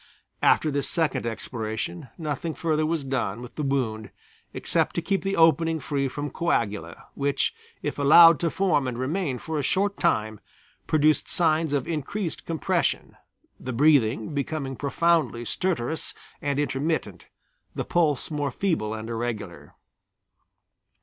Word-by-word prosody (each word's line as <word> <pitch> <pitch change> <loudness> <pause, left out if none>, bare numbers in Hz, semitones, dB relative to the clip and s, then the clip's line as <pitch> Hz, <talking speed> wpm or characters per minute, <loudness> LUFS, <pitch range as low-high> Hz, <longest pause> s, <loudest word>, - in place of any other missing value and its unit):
After 155 - +4
this 140 0 -1
second 150 -8 0
exploration 110 -3 -4
nothing 155 0 -3
further 155 -2 0
was 160 -2 -1
done 125 -6 -2
with 125 -1 -9
the - - -4
wound 125 -7 -1 0.4
except - - -1
to - - 0
keep 195 -1 0
the 195 0 -1
opening 165 0 +4
free 140 -1 -1
from 145 +2 -5
coagula, 105 - -1
which, 140 -1 0 0.3
if - - -3
allowed 165 +3 +8
to 170 - +1
form 160 -7 +1
and 125 -2 -3
remain 140 +1 -1
for 160 +3 -4
a - - +1
short 200 +8 0
time, 110 0 0 0.5
produced 155 0 +3
signs 160 -2 +2
of 140 -3 0
increased 165 +3 -4
compression, 165 -4 -1 0.4
the 130 - -5
breathing 140 +1 +3
becoming 140 -1 -3
profoundly 140 -3 +1
stertorous 160 -2 -1 0.3
and 140 -1 -1
intermittent, 140 - -2 0.5
the - - -3
pulse 160 -5 +1
more 145 -2 -1
feeble 125 - -1
and 110 0 -6
irregular. 110 -10 -5
145 Hz, 135 wpm, -25 LUFS, 120-160 Hz, 0.5 s, allowed